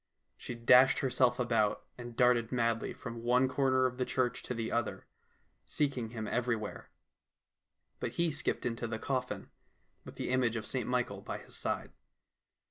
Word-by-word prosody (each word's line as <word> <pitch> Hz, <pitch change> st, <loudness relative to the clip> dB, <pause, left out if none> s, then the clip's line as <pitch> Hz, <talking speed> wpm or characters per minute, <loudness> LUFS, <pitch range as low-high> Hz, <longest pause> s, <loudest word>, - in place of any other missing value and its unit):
She 125 Hz, -, -6 dB
dashed 125 Hz, +3 st, +6 dB
herself 125 Hz, -2 st, +2 dB
about, 115 Hz, -4 st, +1 dB
and 120 Hz, -1 st, -8 dB
darted 125 Hz, -2 st, +3 dB
madly 115 Hz, -2 st, 0 dB
from 115 Hz, -1 st, -7 dB
one 125 Hz, +2 st, +3 dB
corner 130 Hz, -1 st, +2 dB
of 125 Hz, -1 st, -1 dB
the 130 Hz, -, +1 dB
church 125 Hz, -1 st, 0 dB
to 125 Hz, -, -4 dB
the 115 Hz, -1 st, -3 dB
other, 120 Hz, 0 st, -2 dB, 0.6 s
seeking 130 Hz, -6 st, -1 dB
him 110 Hz, -2 st, -5 dB
everywhere. 115 Hz, -3 st, -2 dB, 1.1 s
But -, -, -3 dB
he 170 Hz, -1 st, +1 dB
skipped 145 Hz, -, -1 dB
into 115 Hz, 0 st, -2 dB
the 110 Hz, -1 st, -3 dB
coffin, 125 Hz, +1 st, -3 dB, 0.5 s
with -, -, -11 dB
the -, -, -3 dB
image 125 Hz, -3 st, +2 dB
of 110 Hz, -2 st, -3 dB
St -, -, -2 dB
Michael -, -, -1 dB
by -, -, -5 dB
his -, -, -11 dB
side. -, -, -3 dB
125 Hz, 160 wpm, -32 LUFS, 115-130 Hz, 1.1 s, dashed